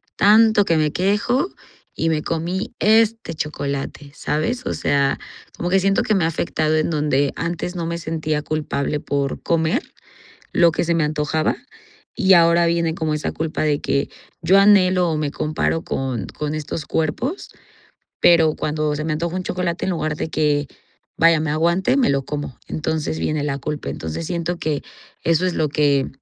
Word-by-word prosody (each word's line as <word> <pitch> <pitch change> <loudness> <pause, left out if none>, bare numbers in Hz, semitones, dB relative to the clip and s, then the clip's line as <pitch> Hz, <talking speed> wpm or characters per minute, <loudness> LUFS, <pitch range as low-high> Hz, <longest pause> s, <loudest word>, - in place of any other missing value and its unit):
tanto 215 +1 +5
que 165 - +2
me 155 -1 +1
quejo 205 - +1 0.5
y 165 - 0
me 155 -1 0
comí 170 +5 -3
este 225 -3 +3
chocolate, 140 -1 -4
¿sabes? 230 - -2
O - - -1
sea, 140 -1 +1 0.4
como 175 - -2
que 195 - +4
siento 195 +1 +2
que 215 - +1
me 190 -4 +2
ha - - +3
afectado 155 -1 0
en 155 +2 +1
donde 145 -2 +1
antes 170 +2 -3
no 170 -2 -3
me 170 - -2
sentía 155 -2 -2
culpable 150 -1 -2
por 140 -1 -2
comer 165 - +1 0.7
lo 170 -1 +4
que - - 0
se 170 0 +1
me 165 -2 +2
antojaba. 150 +1 0 0.6
Y 190 -5 +4
ahora 170 0 +5
viene 170 -1 +1
como 160 -2 -1
esa 150 - -2
culpa 160 0 -3
de 150 -2 +1
que, 140 - -1 0.3
yo 180 +4 +4
anhelo, 185 -3 +5
o 155 - -1
me 150 -2 -2
comparo 155 +2 -1
con 130 -6 -3
con 150 0 -4
estos 155 0 -5
cuerpos. 160 - -2 0.7
Pero, 165 -3 +5
cuando 150 0 -1
se 150 - -3
me 155 0 -1
antoja 170 +3 -2
un 185 - -2
chocolate, 180 -1 -2
en 190 - 0
lugar 155 -3 -2
de 160 - -4
que 145 -2 +1 0.5
vaya, 165 -1 +5
me 155 -2 -1
aguante, 170 - +2
me 260 - +3
lo 140 -1 +1
como, 145 -3 -5
entonces 160 0 -2
viene 155 -1 -1
la 140 -2 -1
culpa. 150 - -4
Entonces 80 - -5
siento 175 0 -2
que 150 -2 -1 0.4
eso 165 +2 +2
es 180 - -1
lo 155 - +1
que, 140 -2 +2
160 Hz, 180 wpm, -21 LUFS, 150-175 Hz, 0.7 s, tanto